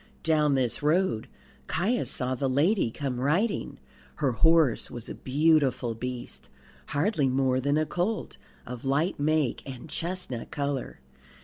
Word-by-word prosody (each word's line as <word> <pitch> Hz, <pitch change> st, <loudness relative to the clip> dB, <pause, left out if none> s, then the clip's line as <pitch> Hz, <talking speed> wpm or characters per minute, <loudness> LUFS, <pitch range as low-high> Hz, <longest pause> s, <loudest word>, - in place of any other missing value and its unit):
Down 150 Hz, -3 st, +3 dB
this 125 Hz, -3 st, 0 dB
road 150 Hz, -, +1 dB, 0.4 s
Caius 210 Hz, +9 st, 0 dB
saw 130 Hz, -1 st, +1 dB
the 135 Hz, +1 st, -1 dB
lady 150 Hz, -, +2 dB
come 130 Hz, +1 st, -4 dB
riding. 170 Hz, -, 0 dB, 0.4 s
Her 140 Hz, -4 st, +1 dB
horse 160 Hz, 0 st, +3 dB
was 120 Hz, -2 st, -6 dB
a -, -, -4 dB
beautiful 135 Hz, -4 st, +2 dB
beast, 125 Hz, +2 st, -6 dB, 0.4 s
hardly 150 Hz, -1 st, +1 dB
more 130 Hz, 0 st, +1 dB
than 145 Hz, +3 st, +1 dB
a 155 Hz, -, +2 dB
colt, 185 Hz, +8 st, -2 dB, 0.3 s
of 125 Hz, -1 st, -7 dB
light 145 Hz, +6 st, 0 dB
make 150 Hz, -3 st, +1 dB
and 135 Hz, +1 st, -8 dB
chestnut 170 Hz, -7 st, -4 dB
colour. 140 Hz, -2 st, -3 dB
145 Hz, 135 wpm, -27 LUFS, 130-160 Hz, 0.4 s, Down